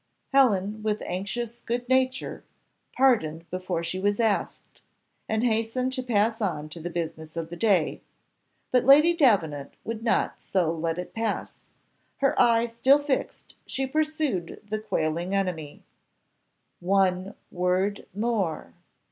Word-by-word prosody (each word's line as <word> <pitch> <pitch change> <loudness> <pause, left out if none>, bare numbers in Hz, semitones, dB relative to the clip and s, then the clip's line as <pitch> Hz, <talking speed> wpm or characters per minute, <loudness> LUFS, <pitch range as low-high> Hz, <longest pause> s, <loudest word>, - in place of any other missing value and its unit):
Helen, 215 -6 +3
with 215 -1 -1
anxious 230 +6 -4
good 245 +1 -3
nature, 260 0 0 0.5
pardoned 170 -12 +2
before 185 -2 -3
she 170 +3 -3
was 205 +2 +1
asked, 220 -3 -1 0.5
and 220 +1 0
hastened 235 +2 0
to 260 - -1
pass 225 -1 +1
on 155 -7 -2
to 165 - -9
the 170 +2 -5
business 160 -1 -5
of 165 0 -4
the - - -5
day, 190 -4 +2 0.7
but 250 -1 +4
Lady 300 +6 +7
Davenant 170 - +2
would 225 -1 -5
not 230 - 0
so 175 -4 0
let 165 0 -2
it 180 - -6
pass; 225 -2 -4 0.5
her 275 -1 +2
eye 230 0 +4
still 240 +4 +4
fixed 290 -2 -3
she 270 - -2
pursued 300 - -1
the 215 +1 -2
quailing 170 -2 -1
enemy 175 -7 -3 1.0
"One 190 +1 +1 0.2
word 185 +3 0
more. 210 -7 -1
205 Hz, 130 wpm, -26 LUFS, 175-240 Hz, 1.0 s, Lady